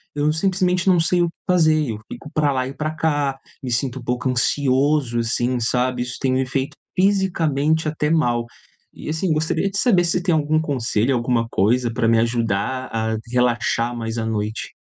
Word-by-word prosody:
Eu 150 Hz, +1 st, +1 dB
simplesmente 180 Hz, +1 st, 0 dB
não 180 Hz, -2 st, +4 dB
sei 175 Hz, +2 st, +2 dB
o 170 Hz, -, +3 dB
que 165 Hz, -, -8 dB
fazer, 155 Hz, -7 st, +3 dB
eu 105 Hz, -, -6 dB
fico 150 Hz, -, -9 dB
pra 150 Hz, -2 st, +2 dB
lá 130 Hz, -1 st, -1 dB
e 135 Hz, -, -6 dB
pra 155 Hz, +1 st, -3 dB
cá, 145 Hz, -4 st, 0 dB, 0.3 s
me 125 Hz, -, -3 dB
sinto 130 Hz, +2 st, -1 dB
um -, -, -11 dB
pouco 125 Hz, +1 st, -2 dB
ansioso 130 Hz, 0 st, +1 dB
assim, 120 Hz, +2 st, 0 dB
sabe? 125 Hz, +1 st, 0 dB
Isso 125 Hz, 0 st, -6 dB
tem 130 Hz, -1 st, +1 dB
me 130 Hz, 0 st, +1 dB
feito 135 Hz, +2 st, -2 dB, 0.2 s
fisicamente 160 Hz, -6 st, +1 dB
até 150 Hz, 0 st, -1 dB
mal, 120 Hz, -8 st, +2 dB, 0.5 s
e -, -, -10 dB
assim 160 Hz, +2 st, -1 dB
gostaria 160 Hz, +5 st, 0 dB
de 200 Hz, -, -5 dB
saber 190 Hz, -8 st, +4 dB
se 175 Hz, +1 st, 0 dB
tem 175 Hz, -4 st, +2 dB
algum 155 Hz, 0 st, +2 dB
conselho, 130 Hz, -4 st, 0 dB
alguma 120 Hz, -1 st, 0 dB
coisa, 120 Hz, +4 st, +1 dB
pra 115 Hz, -, +1 dB
me 115 Hz, 0 st, +4 dB
ajudar 115 Hz, +2 st, -1 dB
a 110 Hz, 0 st, -1 dB, 0.2 s
relaxar 120 Hz, -1 st, +1 dB
mais 115 Hz, 0 st, -4 dB
à 115 Hz, -, -1 dB
noite? 110 Hz, 0 st, -3 dB
135 Hz, 190 wpm, -21 LUFS, 120-155 Hz, 0.5 s, não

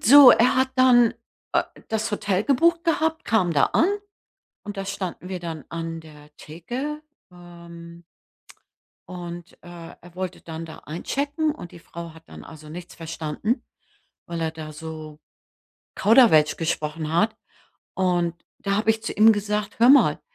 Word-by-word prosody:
So, 275 Hz, +2 st, +10 dB
er 245 Hz, +2 st, +4 dB
hat 260 Hz, 0 st, +2 dB
dann, 245 Hz, -3 st, +5 dB, 0.4 s
äh, -, -, +3 dB, 0.3 s
das 220 Hz, +1 st, -1 dB
Hotel 205 Hz, -1 st, -1 dB
gebucht 335 Hz, +5 st, +3 dB
gehabt, 320 Hz, -1 st, 0 dB
kam 205 Hz, -5 st, +2 dB
da 145 Hz, -, +4 dB
an 330 Hz, -, +2 dB, 0.8 s
und 205 Hz, -1 st, -7 dB
da 195 Hz, -, -3 dB
standen 185 Hz, -1 st, -5 dB
wir 185 Hz, -2 st, -4 dB
dann 165 Hz, -4 st, -7 dB
an 165 Hz, -1 st, -5 dB
der 150 Hz, -1 st, -16 dB
Theke. 250 Hz, -, -6 dB, 0.3 s
Ähm 170 Hz, -1 st, -13 dB, 1.1 s
und, 175 Hz, -1 st, -8 dB
äh, 175 Hz, -, -13 dB, 0.3 s
er 175 Hz, 0 st, -16 dB
wollte 185 Hz, -1 st, -5 dB
dann 165 Hz, 0 st, -7 dB
da 160 Hz, -, -10 dB
einchecken 285 Hz, -, -2 dB
und 175 Hz, -, -10 dB
die 175 Hz, -, -11 dB
Frau 170 Hz, -1 st, -9 dB
hat 160 Hz, 0 st, -16 dB
dann -, -, -11 dB
also 155 Hz, -1 st, -12 dB
nichts 170 Hz, +2 st, -9 dB
verstanden, 165 Hz, -, -3 dB, 0.6 s
weil 170 Hz, -1 st, -5 dB
er 160 Hz, -, -1 dB
da 155 Hz, -1 st, -9 dB
so 155 Hz, -1 st, -9 dB, 0.8 s
Kauderwelsch 205 Hz, -, +5 dB
gesprochen 155 Hz, -1 st, -3 dB
hat. 215 Hz, +6 st, +2 dB, 0.6 s
Und 175 Hz, -2 st, +1 dB, 0.2 s
da 200 Hz, -, -2 dB
habe 215 Hz, +1 st, +2 dB
ich 220 Hz, 0 st, -1 dB
zu -, -, -3 dB
ihm 220 Hz, +2 st, +7 dB
gesagt: 210 Hz, 0 st, -3 dB
„Hör 235 Hz, +2 st, +6 dB
mal, 280 Hz, +1 st, +6 dB
180 Hz, 155 wpm, -24 LUFS, 165-225 Hz, 1.1 s, So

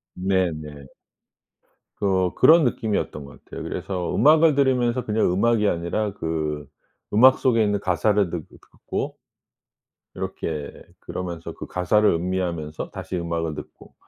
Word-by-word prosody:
네네. 80 Hz, -7 st, -2 dB, 1.1 s
그 95 Hz, -2 st, +1 dB
그런 165 Hz, +1 st, +6 dB
느낌이었던 110 Hz, -, -1 dB
것 70 Hz, -, -15 dB
같아요. -, -, -8 dB
그래서 90 Hz, -3 st, -3 dB
음악을 155 Hz, 0 st, +5 dB
들으면서 125 Hz, -3 st, +1 dB
그냥 105 Hz, -4 st, +1 dB
음악이 105 Hz, +2 st, +2 dB
아니라 90 Hz, +5 st, -1 dB
그 75 Hz, -5 st, -3 dB, 0.5 s
음악 130 Hz, +5 st, +6 dB
속에 115 Hz, -3 st, +3 dB
있는 105 Hz, -1 st, +1 dB
가사를 100 Hz, +1 st, +1 dB
듣 85 Hz, -3 st, -5 dB
듣고 -, -, -6 dB, 1.0 s
이렇게 75 Hz, -3 st, -4 dB, 0.3 s
그러면서 85 Hz, -2 st, -6 dB
그 -, -, -9 dB
가사를 105 Hz, +4 st, +2 dB
음미하면서 85 Hz, -3 st, -2 dB
다시 90 Hz, -, -5 dB
음악을 85 Hz, -2 st, -2 dB
듣고 -, -, -11 dB
95 Hz, 290 characters per minute, -23 LUFS, 85-110 Hz, 1.1 s, 그런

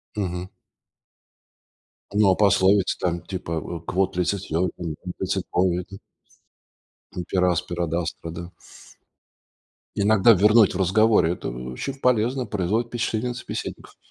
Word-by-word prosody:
Мгм. 90 Hz, -3 st, -3 dB, 1.6 s
Ну 105 Hz, -2 st, +4 dB
а -, -, +3 dB
пословица, 100 Hz, -1 st, +3 dB
там, 85 Hz, -1 st, -1 dB
типа, 85 Hz, -4 st, -4 dB
в 85 Hz, +1 st, -7 dB
Quod 95 Hz, +3 st, 0 dB
licet 90 Hz, +2 st, 0 dB
Jovi, 85 Hz, +3 st, 0 dB
non 85 Hz, -4 st, -4 dB, 0.3 s
licet 95 Hz, 0 st, -1 dB
bovi, 90 Hz, -1 st, +2 dB
эт 95 Hz, +1 st, -12 dB, 1.2 s
И -, -, 0 dB
per 95 Hz, -, +2 dB
aspera 85 Hz, 0 st, -1 dB
ad -, -, -5 dB
astra, 85 Hz, 0 st, -6 dB
да. 85 Hz, 0 st, -7 dB, 1.5 s
Иногда 105 Hz, +2 st, +5 dB
ввернуть 105 Hz, +1 st, +5 dB
в -, -, -1 dB
разговоре. 95 Hz, -1 st, +3 dB
Это -, -, -5 dB
очень 65 Hz, -, -5 dB
полезно, 125 Hz, +1 st, +1 dB
производит 105 Hz, +3 st, -1 dB
впечатление 120 Hz, 0 st, -2 dB
на -, -, -3 dB
собеседникoв. -, -, -7 dB
95 Hz, 130 wpm, -24 LUFS, 85-105 Hz, 1.6 s, Иногда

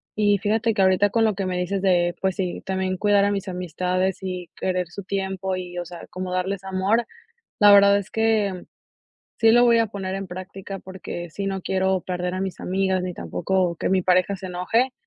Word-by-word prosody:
Y 205 Hz, -1 st, +3 dB
fíjate 220 Hz, +3 st, +1 dB
que 200 Hz, -, +1 dB
ahorita 190 Hz, +2 st, +4 dB
con 225 Hz, -1 st, +2 dB
lo 215 Hz, -3 st, +2 dB
que 195 Hz, -1 st, -2 dB
me 180 Hz, -1 st, -2 dB
dices 185 Hz, +2 st, -1 dB
de 175 Hz, -2 st, +2 dB
pues 190 Hz, -1 st, 0 dB
sí, 185 Hz, -3 st, -3 dB
también 190 Hz, -1 st, -1 dB
cuidar 205 Hz, 0 st, +3 dB
a 205 Hz, -, +1 dB
mis 200 Hz, 0 st, -3 dB
amistades 180 Hz, +1 st, -1 dB
y 180 Hz, -2 st, -5 dB
querer 180 Hz, -2 st, -1 dB
su 200 Hz, +2 st, -8 dB
tiempo, 190 Hz, -1 st, -2 dB
y 180 Hz, -1 st, -6 dB
o 175 Hz, -, -3 dB
sea, 175 Hz, 0 st, -10 dB
como 185 Hz, 0 st, -5 dB
darles 190 Hz, +1 st, -2 dB
amor, 195 Hz, +5 st, +1 dB, 0.5 s
la 205 Hz, -1 st, +7 dB
verdad 200 Hz, 0 st, +7 dB
es 200 Hz, +1 st, -7 dB
que, 215 Hz, -5 st, +1 dB, 0.7 s
sí 225 Hz, -, +5 dB
lo 240 Hz, +2 st, +6 dB
voy 235 Hz, -1 st, +5 dB
a 225 Hz, -, +3 dB
poner 195 Hz, -2 st, -4 dB
en 195 Hz, 0 st, -4 dB
práctica 185 Hz, +2 st, -7 dB
porque 180 Hz, -2 st, -7 dB
sí 195 Hz, +5 st, -5 dB
no 195 Hz, -1 st, -2 dB
quiero 190 Hz, 0 st, 0 dB
perder 180 Hz, 0 st, -3 dB
a 185 Hz, -, -3 dB
mis 190 Hz, -3 st, -4 dB
amigas, 190 Hz, 0 st, 0 dB
ni 180 Hz, 0 st, -3 dB
tampoco 170 Hz, -, -1 dB
que -, -, -2 dB
mi 190 Hz, 0 st, +3 dB
pareja 185 Hz, +2 st, +2 dB
se 190 Hz, 0 st, -8 dB
enoje. 225 Hz, +9 st, 0 dB
190 Hz, 210 wpm, -23 LUFS, 180-200 Hz, 0.7 s, la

